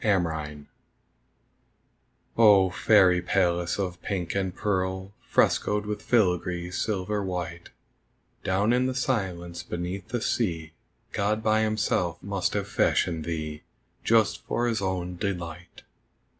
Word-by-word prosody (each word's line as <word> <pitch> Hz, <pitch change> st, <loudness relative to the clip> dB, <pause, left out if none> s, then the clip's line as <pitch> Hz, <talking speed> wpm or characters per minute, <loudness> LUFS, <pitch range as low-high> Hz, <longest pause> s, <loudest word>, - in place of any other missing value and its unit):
THE 105 Hz, -3 st, +4 dB
SEA 75 Hz, -4 st, -3 dB
SHELL -, -, -22 dB, 1.7 s
Oh, 100 Hz, -4 st, +6 dB
fairy 90 Hz, -2 st, +4 dB
palace 90 Hz, -1 st, +1 dB
of 90 Hz, -3 st, -3 dB
pink 90 Hz, -4 st, -3 dB
and 95 Hz, -2 st, -1 dB
pearl 95 Hz, -1 st, -2 dB, 0.2 s
Frescoed 105 Hz, 0 st, +2 dB
with 105 Hz, 0 st, -4 dB
filigree 90 Hz, -5 st, +1 dB
silver 100 Hz, +1 st, -1 dB
white, 85 Hz, -2 st, -4 dB, 0.7 s
Down 100 Hz, +5 st, +2 dB
in 125 Hz, +1 st, +2 dB
the 130 Hz, -, -2 dB
silence 90 Hz, -9 st, -2 dB
beneath 90 Hz, +3 st, -5 dB
the 120 Hz, +2 st, -2 dB
sea 80 Hz, -8 st, -1 dB, 0.4 s
God 105 Hz, +2 st, 0 dB
by 110 Hz, 0 st, +3 dB
Himself 110 Hz, -1 st, 0 dB
must -, -, -1 dB
have -, -, -1 dB
fashioned 80 Hz, -3 st, +1 dB
thee 80 Hz, -2 st, -4 dB, 0.4 s
Just 110 Hz, -2 st, +3 dB
for 120 Hz, -, 0 dB
His 115 Hz, -4 st, 0 dB
own 90 Hz, -2 st, -2 dB
delight! 90 Hz, -2 st, -5 dB
95 Hz, 125 wpm, -27 LUFS, 85-105 Hz, 1.7 s, Oh